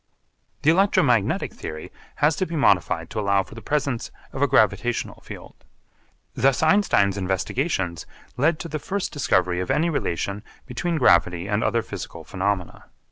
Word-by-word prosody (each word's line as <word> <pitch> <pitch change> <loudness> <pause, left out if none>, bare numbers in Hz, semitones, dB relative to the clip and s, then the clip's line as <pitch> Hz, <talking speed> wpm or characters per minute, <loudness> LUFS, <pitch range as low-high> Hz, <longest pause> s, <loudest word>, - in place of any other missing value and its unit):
The 155 - +6
electromagnetic 145 - +2
theory 80 0 -7 0.2
has 150 +1 +2
to 185 - -1
be 170 - -5
modified 90 - +2
to 110 - -3
allow 100 -1 +2
for - - -15
the 115 - -9
presence 140 -1 -1 0.2
of - - -5
a - - +4
gravitational - - +1
field. - - -12 0.7
Thus 135 +2 +2
Einstein's 160 - +3
investigations 95 - -2 0.3
lead 155 +5 +2
to - - -5
the 155 -1 -4
first 200 +5 -3
discovery 90 - +1
of 90 - -3
any 170 +2 +2
relation 100 - -2 0.2
between 165 +7 -2
gravity 85 - +3
and 105 +2 0
other 115 +1 +1
physical - - -8
phenomena. 95 -2 -3
110 Hz, 150 wpm, -23 LUFS, 95-150 Hz, 0.7 s, The